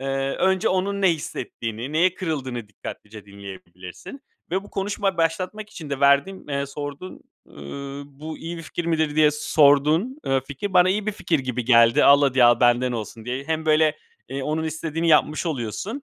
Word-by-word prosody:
eee, 135 - -5 0.3
önce 190 -1 +2
onun 195 +2 -1
ne 190 - +5
hissettiğini, 120 -3 -6
neye 175 +3 +3
kırıldığını 130 - -4
dikkatlice 105 +1 -10
dinleyebilirsin. 95 - -11 0.3
Ve 190 +3 -1
bu - - -15
konuşmayı 195 -1 -2
başlatmak 185 +6 -2
için 155 -8 -9
de 140 - -3
verdiğin, 140 +7 +2
eee, 140 0 -2
sorduğun, 145 +5 -7 0.3
ııı, 140 - -8
"Bu 150 +3 -9
iyi 170 +1 -6
bir 165 - -8
fikir 170 +2 -5
midir?" 160 -2 0
diye 150 -1 +5
sorduğun 150 - +3
eee 135 0 +2
fikir 150 +8 -5
bana 180 0 +6
iyi 210 +2 -1
bir 215 - 0
fikir 170 -5 -1
gibi 125 -2 -3
geldi 115 -1 +5
al 140 +1 +7
hadi 130 -3 +4
al 120 0 +5
benden 120 +1 +3
olsun 110 0 -6
diye. 130 +3 -4
Hem 160 0 -2
böyle, 155 0 +3 0.3
eee, 135 +1 -4
onun 155 +3 -2
istediğini 160 +1 -2
yapmış 155 +2 +3
oluyorsun, 160 - -4
150 Hz, 175 wpm, -23 LUFS, 130-170 Hz, 0.3 s, al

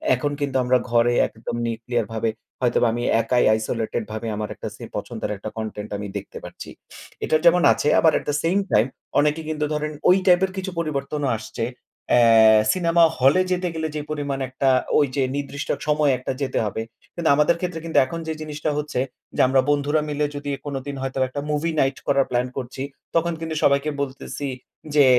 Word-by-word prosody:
এখন 145 -1 -2
কিন্তু 140 -2 -2
আমরা 125 +1 +3
ঘরে 120 0 +4
একদম 110 +1 -7
neuclear 115 0 -2
ভাবে 110 0 0 0.3
হয়তোবা 120 -1 +3
আমি 120 +1 -2 0.2
একাই 120 +2 +2
isolated 110 +1 -2
ভাবে 110 +1 -4
আমার 105 0 -4
একটা - - -6
সি - - -11
পছন্দের - - -4
একটা 105 - -6
content 110 -1 -5
আমি 105 0 -5
দেখতে 100 - -8
পারছি। - - -9 0.6
এটা - - +2
যেমন 175 +1 +6
আছে - - -2
আবার 160 - +5
at - - -13
the 145 - +1
same 180 +5 +2
time 110 +3 +4 0.3
অনেকে 150 +2 +2
কিন্তু 150 -1 -1
ধরেন 150 0 -2 0.2
ওই 180 - +7
টাইপের 185 +1 +4
কিছু 190 0 -3
পরিবর্তনও 145 -2 -2
আসছে। 110 +1 -6 0.5
অ্যা 110 -2 +6
সিনেমা 170 -2 +3 0.2
হলে 135 +8 +5
যেতে 180 0 0
গেলে 160 -1 -2
যে 150 - -2
পরিমাণ 145 -2 -2
একটা 135 +1 +1 0.3
ওইযে 140 -1 +1
নির্দিষ্ট 145 0 -4 0.2
সময়ে 150 -2 +3
একটা 125 - -4
যেতে 135 - -1
হবে। 105 +1 -3 0.3
কিন্তু 170 -2 0
আমাদের 150 +3 +3
ক্ষেত্রে 180 -2 -3
কিন্তু 165 - -1
এখন 165 +6 -6
যে 160 - -1
জিনিসটা 155 0 -3
হচ্ছে 150 -3 -2 0.4
যে - - +3
আমরা 130 0 +4
বন্ধুরা 145 +1 +2
মিলে 150 0 0
যদি 145 0 -5 0.2
কোনদিন 140 0 -4
হয়তোবা 135 0 0
একটা 140 +3 -5
movie 150 +2 0
night 135 0 +1
করার 140 -1 +3
প্ল্যান 125 0 +1
করছি, 130 0 -5 0.3
তখন 170 +1 +2
কিন্তু 160 -1 -4
সবাইকে 140 +2 +3
বলতেছি 140 +1 -5 0.5
যে, 145 -2 +7
140 Hz, 185 wpm, -23 LUFS, 120-155 Hz, 0.6 s, ওই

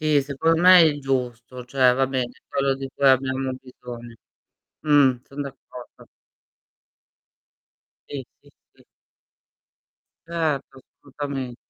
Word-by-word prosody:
Sì, 155 -2 +3
secon 160 +4 0
me 180 0 +8
è - - +8
il 150 -3 +2
giusto; 125 -2 -3
cioè 130 -1 +3
va 135 +1 +2
bene, 130 -2 -2 0.2
quello 135 0 0
di 135 0 -6
cui 140 - +1
abbiamo 130 0 +1
bisogno. 120 -2 -11 0.7
Mh, 145 -4 +4
son 140 +1 -6
d'accordo. 130 -2 -12 2.0
Sì, 140 -2 -6 0.2
sì, - - -22 0.2
sì. - - -24 1.4
Certo, 155 -5 -2 0.2
assolutamen 135 -3 -5
135 Hz, 115 wpm, -23 LUFS, 125-145 Hz, 2.0 s, me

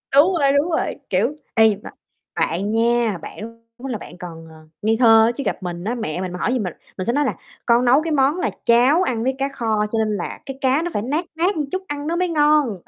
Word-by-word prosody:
Đúng 325 +7 +6
rồi, 275 -1 +4
đúng 300 +5 +1
rồi, 320 - -1
kiểu, 295 - +1 0.2
ê, 220 -2 +5
mà - - -8 0.5
bạn 195 +6 -1
nha, 230 -3 +2
bạn 230 +5 -9 0.2
lúc 260 +2 -6
đó 230 - -2
bạn 175 - -11
còn, 165 -2 -9
ờ, 160 - -14 0.3
ngây 220 +2 +2
thơ 225 -1 +6
chứ 280 - -4
gặp - - -3
mình 175 -1 -5
á, 230 +5 -2
mẹ 180 -6 -3
mình 185 -1 -4
mà 180 - -6
hỏi 250 - 0
gì 255 - 0
mình, 180 -5 -3 0.2
mình 185 - -3
sẽ 235 - 0
nói 290 0 +2
là - - 0 0.3
con 240 +1 +3
nấu 260 +5 +5
cái 325 - -3
món 285 +3 +2
là - - 0
cháo 250 +9 +4
ăn 235 -6 -1
với 265 +1 0
cá 275 +1 -1
kho, 220 -5 -1
cho 225 - 0
nên 215 -1 0
là 175 - -5
cái 270 -1 -7
cá 265 +4 +2
nó 345 - -3
phải 205 - -1
nát 295 +9 -2
nát 360 +5 +1
một 300 -2 -1
chút 375 0 -2
ăn 290 +1 -4
nó 335 - -1
mới 360 +1 +1
ngon. 295 - +2
240 Hz, 260 wpm, -21 LUFS, 215-290 Hz, 0.5 s, Đúng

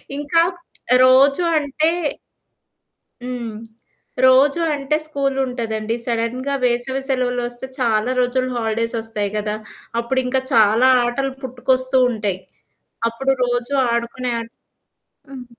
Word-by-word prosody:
ఇంకా 295 +3 +2 0.6
రోజు 270 +5 +5
అంటే 300 +2 +1 1.3
హ్మ్. 245 -3 -5 0.7
రోజు 270 +4 +5
అంటే 285 +1 -1
స్కూలుంటదండి. 250 -6 -2
సడన్‌గా 245 +4 -2
వేసవి 245 +2 0
సెలవులొస్తే 245 -1 -2
చాలా 230 -1 +1
రోజులు 255 +1 +1
హాలిడేసొస్తాయి 225 -2 -2
కదా! 210 0 -2 0.5
అప్పుడు 260 +3 -1
ఇంకా 255 +1 +1
చాలా 220 +3 +5 0.2
ఆటలు 270 +3 -1
పుట్టుకొస్తూ 255 +1 0
ఉంటాయి. 205 -5 -2 0.7
అప్పుడు 270 +4 0
రోజు 245 +1 -2 0.2
ఆడుకునే 240 +1 -2
ఆ - - -3 0.9
హ్మ్. 260 -2 -9
250 Hz, 95 wpm, -20 LUFS, 230-265 Hz, 1.3 s, రోజు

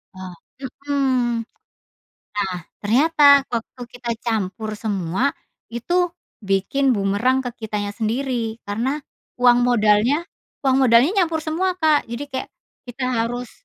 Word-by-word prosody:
Oh, 185 -1 -8 0.3
mhm. 260 -3 -1 0.9
Nah, 195 -3 -2 0.2
ternyata 280 +5 +5
waktu 235 +2 -5
kita 245 -1 -5
campur 215 -1 -2
semua, 200 +4 -1 0.4
itu 350 +10 0 0.3
bikin 200 +8 +1
bumerang 205 +6 +1
ke 245 - -3 0.2
kitanya 205 -1 -3
sendiri 230 0 -2
karena, 235 +8 -1 0.4
uang 245 0 +6
modalnya 235 +5 +3 0.4
uang 265 -1 +3
modalnya 235 +7 +5
nyampur 320 -2 -1
semua, 360 +4 -1
Kak, 315 -4 +2
jadi 235 +4 -5
kayak 260 - -4 0.4
kita 245 +2 -5
harus 240 0 -2
245 Hz, 115 wpm, -21 LUFS, 215-275 Hz, 0.9 s, uang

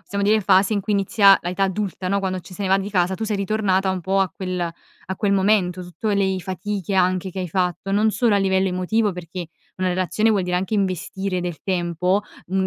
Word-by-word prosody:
possiamo 200 +2 -4
dire, 215 +2 +4
fase 190 +1 +3
in 205 - 0
cui 200 +2 -2
inizia 200 0 +5
la 175 - -4
età 195 +2 0
adulta, 190 -1 -3
no, 200 +1 +1
quando 190 -1 -2
ce 185 - -13
ne 200 - -2
si - - -1
va 195 - +5
di 195 +1 -4
casa, 185 -1 +1
tu 220 - -4
sei 215 -1 -1
ritornata 195 -1 +1
un 190 -1 -2
po' 190 +3 +1
a 190 - +2
quel 185 -1 -4 0.5
a 190 - -3
quel 200 +1 +1
momento, 190 -2 +2
tutto 180 +5 -5
lei 190 -2 +1
fatiche 190 +2 -4
anche 185 0 +1
che 190 - -7
hai 180 - -3
fatto 180 +2 -1
non 215 +2 +3
solo 230 0 +2
a - - +4
livello 190 -1 +2
emotivo, 195 +4 0
perché 175 0 -7 0.3
una 185 0 0
relazione 185 +5 +1
vuol 205 -3 +2
dire 180 0 -1
anche 190 +4 -2
investire 190 -1 -1
del 175 -2 -5
tempo, 180 +1 0 0.2
mhmm, 190 +1 0
190 Hz, 230 wpm, -22 LUFS, 185-200 Hz, 0.5 s, inizia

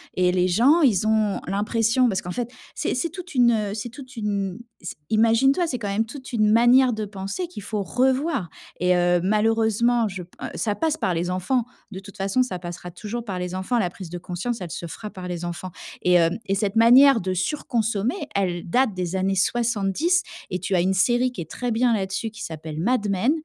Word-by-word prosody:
et 180 -1 +3
les 180 0 +2
gens, 250 - +4
ils 220 - +3
ont 215 -2 +1
l'impression 225 +5 +2
parce 190 -5 0
qu'en 180 - -5
fait 245 +3 -3 0.3
c’est 310 - -1
c'est 295 +7 -1
toute 360 0 -9
une, 245 -2 +5
heu 210 -3 -1
c'est 220 +2 -5
toute 255 +1 -12
une 200 -4 -2 0.2
c 175 - -6
imagine-toi, 230 +9 +3
c'est 260 - -2
quand 205 -3 -3
même 210 +3 0
toute 260 +3 -10
une 215 -2 +3
manière 240 +3 +5
de 215 -1 -3
penser 200 - -5
qu'il 335 - -9
faut 210 0 -2
revoir. 260 - 0 0.3
Et 180 +1 +3
heu, 175 0 +3
malheureusement, 225 +3 +2
je 190 -2 -6
p 175 - -19 0.2
ça 210 - 0
passe 320 +3 0
par 190 - 0
les 175 +1 -1
enfants. 190 +7 0 0.3
De 190 - -6
toute 200 0 -13
façon, 195 +6 +1
ça 230 -8 -4
passera 175 0 -7
toujours 215 +6 -6
par 195 -4 -4
les 180 0 -4
enfants. 190 +6 -1
La 185 -5 0
prise 185 -1 -9
de 175 - -5
conscience, 185 +7 -4
elle 175 - -6
se 170 - -5
fera 210 +6 -7
par 185 -1 -8
les 175 -1 -4
enfants. 175 +2 -5 0.3
Et 180 - +3
hem, 170 -1 +4
et 195 - 0
cette 200 +1 -1
manière 245 +3 +7
de 185 +1 -2
surconsommer, 225 - -1 0.2
elle 180 -3 -1
date 250 +3 +2
des 180 0 -3
années 190 +1 0
70. 240 - +1 0.3
Et 180 - -2
tu 190 +2 -3
as 175 - +3
une 190 +2 +1
série 240 +6 +2
qui 205 - -7
est 160 - -8
très 245 -1 -3
bien 235 +1 +2
là-dessus 195 +2 -2
qui 220 - -9
s'appelle 155 -1 -6
Mad 215 +3 +1
Men 200 +7 +2
210 Hz, 220 wpm, -23 LUFS, 185-245 Hz, 0.3 s, manière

